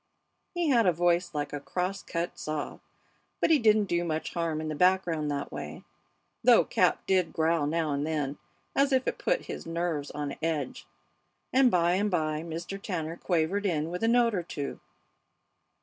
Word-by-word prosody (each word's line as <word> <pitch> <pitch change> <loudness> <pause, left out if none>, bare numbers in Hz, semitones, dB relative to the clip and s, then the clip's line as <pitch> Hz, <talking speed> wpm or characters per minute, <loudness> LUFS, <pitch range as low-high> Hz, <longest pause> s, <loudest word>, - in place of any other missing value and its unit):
He 345 -3 +1
had 235 -6 +4
a - - +6
voice 175 +1 +2
like 145 0 -2
a 145 - -2
cross 180 +6 -3
cut 170 +1 -4
saw, 155 -1 -4 0.6
but - - +2
he 310 - +6
didn't 215 -2 +4
do 175 -2 0
much 160 -2 -3
harm 165 -3 -1
in 155 - -4
the 155 - -2
background 175 -2 +2
that 140 -1 -3
way, - - -7 0.6
though - - +6
Cap - - +2
did 185 -3 +2
growl 160 -2 +1
now 160 0 0
and 140 0 -1
then, 145 -3 -2 0.4
as 275 +1 +3
if 260 -1 +2
it - - -1
put - - +1
his - - -7
nerves 165 -4 -2
on 145 -1 -4
edge. 150 - -2 0.7
And 260 0 +6
by 175 -4 +3
and 200 +3 +1
by 155 -4 0
Mr. 170 +4 -6
Tanner 165 -5 -3
quavered 180 +4 0
in 160 -2 -1
with 180 - -4
a 225 - +2
note 235 -1 +4
or 185 - 0
two. 145 -4 -5
170 Hz, 180 wpm, -29 LUFS, 155-195 Hz, 0.7 s, a